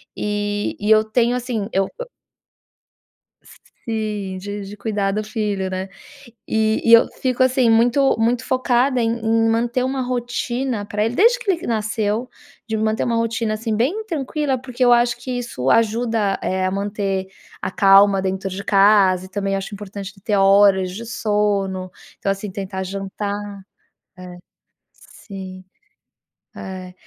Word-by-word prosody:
e 205 0 -2
e 210 +1 0
eu 215 0 +6
tenho, 235 +2 +1
assim, 240 -5 -3
eu 195 0 +2
eu - - -5 1.8
Sim, 210 -4 -3
de 205 +1 -6
de 200 - -9
cuidar 200 -2 -1
do 215 +2 -2
filho, 210 -3 -2
né. 185 +1 -4 0.6
E 220 0 +1
e 230 - +6
eu 230 - +8
fico, 255 -1 0
assim, 255 -2 +3
muito 240 +5 +4
muito 235 +2 +1
focada 255 0 +1
em 230 0 +1
em 225 0 +2
manter 240 +2 0
uma 265 +1 -1
rotina 245 -2 -2
pra 210 +1 -1
ele 235 +2 -2
desde 480 +4 +4
que 435 -5 0
ele 345 -2 -4
nasceu. 220 +1 -1 0.4
De 220 - -2
manter 220 +1 0
uma 235 -1 0
rotina, 230 -1 -1
assim, 220 0 -2
bem 295 - 0
tranquila 295 -5 -2
porque 255 0 -3
eu 245 - +5
acho 240 +1 +2
que 255 - -7
isso 135 - -3
ajuda, 225 - +1
eh, 185 0 0
a 185 - 0
manter 195 -1 -2 0.3
a - - -3
calma 195 0 +5
dentro 190 0 -2
de 190 +2 -6
casa 195 -2 +4
e - - -13
também 195 0 -2
acho 195 +2 -5
importante 200 -1 -7
de 195 - -21
ter 210 -1 0
horas 195 -1 +4
de 230 +4 -7
sono. 205 -4 -1 0.3
Então, 195 - 0
assim, 195 +1 -5
tentar 190 0 -5
jantar. 200 +1 -5 0.6
É, 180 -1 -10 0.6
sim. 190 -2 -11 0.9
É. 185 -1 -8
210 Hz, 155 wpm, -20 LUFS, 195-235 Hz, 1.8 s, eu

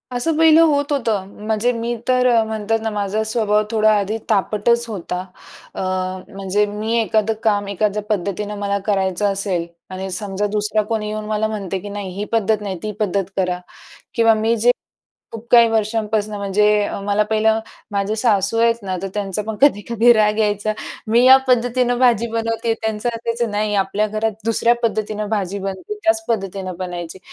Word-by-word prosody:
असं 310 +6 0
पहिलं 320 0 +6
होत 285 -1 0
होतं. 225 -8 0 0.2
म्हणजे 220 +2 +1
मी 235 0 -3
तर 255 0 +3 0.2
म्हणतात 220 0 -1
ना 225 - -1
माझा 205 +1 -1
स्वभाव 215 -1 +1
थोडा 215 -1 +4
आधी 205 +2 -1
तापटच 215 +4 +2
होता. 180 -4 -4 0.6
अ, - - -4 0.5
म्हणजे 195 +1 0
मी 215 +3 -2
एखादं 220 0 +1
काम 205 -2 +1
एखाद्या 205 +1 -1
पद्धतीनं 205 +1 -2
मला 200 0 0
करायचं 195 -1 0
असेल 195 -3 -1 0.2
आणि 190 +1 -5
समजा 195 +2 -3
दुसरा 210 +1 +1
कोणी 215 -2 -1
येऊन 215 0 -4
मला 215 0 0
म्हणत 205 -4 -5
आहे 190 - -1
की 205 - -7
नाही 200 -1 -5
ही 205 +1 -3
पद्धत 220 -1 +1
नाही, 195 -3 -4
ती 215 - -2
पद्धत 200 -2 0
करा 180 -1 0 0.6
किंवा 230 -2 +5
मी 225 +2 +1
जे 235 +3 +4 0.6
खूप 225 0 -8
काही 235 -1 +7
वर्षांपासनं 215 -1 -1
म्हणजे 200 +1 +1 0.4
मला 205 +1 +1
पहिलं 220 +1 +2 0.3
माझे 200 +1 0
सासू 215 -2 +1
आहेत 230 0 +4
ना 190 -2 -3
तर 195 - -2
त्यांचा 205 -1 -2
पण 215 0 -5
कधी-कधी 235 -2 +4
राग 210 -1 +2
यायचा. 210 0 +1 0.3
मी 230 +2 +4
या 260 +1 +9
पद्धतीनं 245 0 +2
भाजी 235 -3 +3
बनवते 230 0 -1
त्यांचं 220 +1 -3
असायचं 230 0 -2
"नाही, 210 0 -1
आपल्या 200 +2 +1
घरात 215 +1 -1
दुसऱ्या 230 +1 +3
पद्धतीनं 215 -1 -1
भाजी 200 -2 -2
बनते 195 - -5
त्याच 330 0 +2
पद्धतीनं 195 -4 -2
बनायची." 175 -1 -6
215 Hz, 170 wpm, -20 LUFS, 200-230 Hz, 0.6 s, या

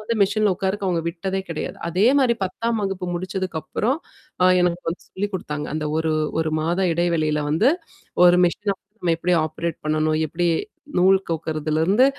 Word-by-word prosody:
வந்து 230 +2 -2
மெஷின்ல 205 0 +2
உட்காருக்கு 195 +1 -1
அவங்க 170 -2 0
விட்டதே 190 +3 -3
கெடையாது. 160 - -4
அதே 190 +6 +3
மாரி 240 -3 +3
10ம் 230 +4 -2
வகுப்பு 190 -2 -3
முடிச்சதுக்குப்புறம் 185 - -2 0.4
அ - - +6 0.2
எனக்கு 175 0 +1
வந்து 175 - -7
சொல்லி் 205 +2 -3
குடுத்தாங்க. 150 -4 -4
அந்த 155 -1 -2
ஒரு 160 -1 0 0.3
ஒரு 155 -1 -1
மாத 170 +4 0 0.2
இடைவெளியில 160 -3 +1
வந்து 215 - +4 0.6
ஒரு 175 0 +6
மிஷின 200 +3 -1 0.3
நம்ம 170 -2 +2
எப்படி 180 +1 +1
ஆப்ரேட் 165 +2 -4
பண்ணணும்? 155 0 +1
எப்படி 175 +3 0 0.5
நூல் 190 +2 +6
கோக்குறதுலருந்து, 160 - +1
175 Hz, 155 wpm, -22 LUFS, 160-195 Hz, 0.6 s, அ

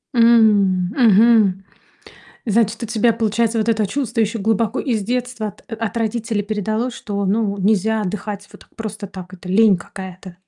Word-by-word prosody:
М, 210 -6 +4
мгм, 215 -4 +4 0.8
значит, 230 +1 +1
у - - -2
тебя, 230 0 +2
получается, 225 +1 0
вот 215 +2 0
это 215 -2 +1
чувство 235 0 -2
ещё 220 +1 -1
глубоко 225 +3 0
из 225 -7 -1
детства 245 -1 -3
от 205 - -11
от 225 0 -3
родителей 225 -1 -1
передалось, 220 +4 -2
что, 200 -3 -4
ну, 200 0 0
нельзя 215 +2 +1
отдыхать 205 +1 -5
вот - - -15
так - - -21
просто 215 -2 -6
так, 185 -1 -10
это 180 0 -10
лень 205 -1 +4
какая-то. 185 0 -10
215 Hz, 160 wpm, -19 LUFS, 200-230 Hz, 0.8 s, М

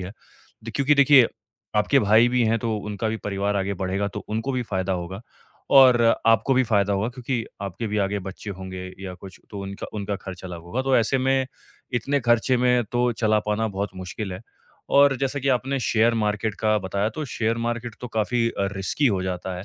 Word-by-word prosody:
है। 90 +2 -6 0.5
द 115 - -5
क्योंकि 145 +1 +3
देखिए, 140 -3 +7 0.5
आपके 135 +6 +3
भाई 110 +3 +5
भी 125 0 +2
हैं 115 +1 +2
तो 110 0 -2
उनका 105 +1 -3
भी 110 - -2
परिवार 100 0 -1
आगे 100 +1 -1
बढ़ेगा 95 +2 -2
तो 105 +1 -7
उनको 115 +5 -2
भी 125 -1 -1
फायदा 95 -2 -2
होगा 90 +3 -4 0.6
और 130 -3 +8 0.3
आपको 115 +4 +4
भी 130 - +4
फायदा 100 -3 +2
होगा, 100 +4 0
क्योंकि 125 -2 -3 0.2
आपके 100 +4 -4
भी 105 +1 -1
आगे 100 +1 0
बच्चे 95 +2 -7
होंगे 95 -1 -7
या 95 -2 -6
कुछ 95 +1 -12
तो 100 -2 -6
उनका 100 0 -6
उनका 100 -1 -3
खर्च 95 -2 -9
अलग 90 -2 -7
होगा। 115 +10 -3
तो 135 -1 +2
ऐसे 120 +4 +2
में, 130 0 +1 0.5
इतने 140 +4 0
खर्चे 120 +2 +2
में 125 -1 +3
तो 120 0 +2
चला 110 -1 +2
पाना 110 +1 0
बहुत 100 0 -3
मुश्किल 95 +2 -5
है 90 - -7 0.6
और 140 -1 +6
जैसा 135 +1 -1
कि 135 - -1
आपने 135 +2 +1
शेयर 115 0 +2
मार्केट 105 -1 -1
का 110 -1 +2
बताया 100 +2 -1
तो 155 - -2
शेयर 115 -3 -1
मार्केट 120 0 -3
तो 125 - -6
काफ़ी 115 +2 0
अ, 100 -3 -2
रिस्की 95 +9 0
हो 95 -5 +1
जाता 90 0 -4
है। 95 - -8
110 Hz, 210 wpm, -24 LUFS, 100-125 Hz, 0.6 s, और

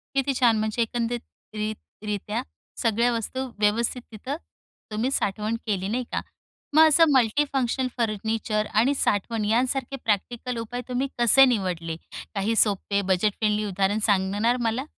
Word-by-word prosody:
किती 275 0 +1
छान, 235 -3 +4
म्हणजे 215 +2 0
एकंदरीत 235 +1 -2 0.3
रित् 215 0 -6
रित्या 210 +3 -2 0.4
सगळ्या 235 +1 +2
वस्तू 260 +3 -3
व्यवस्थित 230 +4 +1
तिथं 260 +7 -5 0.6
तुम्ही 225 +5 0
साठवण 215 -2 -1
केली 195 -3 -1
नाही 245 +4 -1
का. - - 0 0.6
मग 320 0 +9
असं 320 +2 +6
मल्टीफंक्शनल 260 +1 +1
फर्निचर 215 -1 -1
आणि 240 +7 +3
साठवण 220 -3 0
यांसारखे 255 +4 0
प्रॅक्टिकल 235 +4 -1
उपाय 235 +2 -4
तुम्ही 255 +2 -1
कसे 240 +3 +7
निवडले? 180 -9 -1 0.4
काही 215 +3 0
सोपे, 200 -1 +2
बजेट 190 +2 +1
फ्रेंडली 210 -1 +1
उदाहरण 200 +1 0
सांगणार 205 +4 +2
मला? 230 +3 -1
225 Hz, 135 wpm, -25 LUFS, 210-245 Hz, 0.6 s, मग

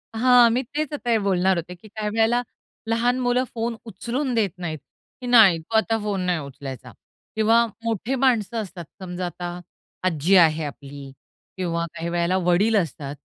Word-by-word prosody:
हां, 245 0 +6
मी 245 +3 +1
तेच 295 +4 -4
आता 250 -4 -4
हे 230 - +4
बोलणार 190 -2 +1
होते, 175 +2 -5
की 200 +5 -16
काही 210 0 -4
वेळेला 225 +3 +2 0.5
लहान 240 +2 +1
मुलं 250 0 +1
फोन 230 0 -2
उचलून 240 +6 -3
देत 215 -4 +2
नाहीत, 165 -4 -5 0.4
की 250 - -5
नाही, 220 -8 +6
तु 165 +8 -7
आता 225 0 +1
फोन 205 -3 -2
नाही 180 -2 0
उचलायचा 135 -3 -8 0.4
किंवा 225 +2 +4 0.2
मोठे 230 +3 -1
माणसं 240 -4 +1
असतात, 180 -4 -8 0.2
समजा 180 -1 -4
आता 175 0 -6 0.4
आजी 180 +1 +2
आहे 160 -3 +5
आपली 140 -1 -9 0.5
किंवा 170 -2 -1
काही 170 +1 -4
वेळेला 175 +2 +1
वडील 185 +5 +2
असतात, 145 -6 -3
195 Hz, 165 wpm, -23 LUFS, 170-230 Hz, 0.5 s, हां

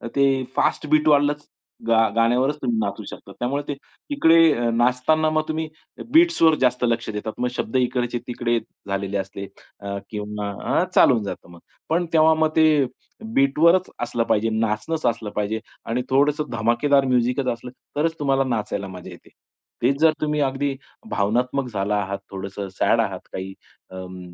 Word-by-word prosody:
ते 135 -1 +3
फास्ट - - +1
बीटवाल्याच 150 -1 +3 0.4
गा 115 -1 +4
गाण्यावरच 125 +5 +2
तुम्ही 120 -3 0
नाचू 100 -2 -3
शकतात. - - -11
त्यामुळे 140 +4 -1
ते 145 - -3 0.4
इकडे 165 - +4
नाचताना 125 +7 +2
मग 155 0 +1
तुम्ही 160 0 -2 0.5
बीट्सवर 325 - +5
जास्त 125 -1 +2
लक्ष 115 -1 -1
देतात. 105 0 -4
मग 125 - +1
शब्द 120 -1 -4
इकडचे 125 -1 0
तिकडे 120 -1 0 0.3
झालेले 100 0 -2
असले 100 0 -5 0.3
अ, 100 0 -5
किंवा 105 -1 -4 0.3
अ, - - +2
चालून 120 -6 +5
जातं 100 -3 -7
मग. 85 - -14 0.3
पण 170 +2 +1
तेव्हा 160 0 +6
मग 160 0 +2
ते 155 -3 +4 0.5
बीटवरच 165 +6 +4
असलं 120 -1 -1
पाहिजे, 115 0 +1
नाचणचं 110 +8 0
असलं 115 -2 -4
पाहिजे 105 +1 -2 0.3
आणि 115 +2 -1
थोडंसं 145 +3 +2
धमाकेदार 120 +5 +2
म्युझिकच 125 +1 +1
असलं, 120 +1 -10 0.2
तरच 160 +2 0
तुम्हाला 135 -2 +2
नाचायला 105 -5 -2
मजा 90 -2 -9
येते. - - -14 0.5
तेच 135 +4 +2
जर 160 -1 +6
तुम्ही 150 0 0
अगदी 135 0 -1 0.3
भावनात्मक 125 +6 0
झाला 100 +1 0
आहात, 100 0 -4
थोडंसं 100 +1 -6
सॅड - - +2
आहात - - -3
काही 95 +1 -5 0.4
अं 90 -1 -9
125 Hz, 155 wpm, -22 LUFS, 105-145 Hz, 0.5 s, तेव्हा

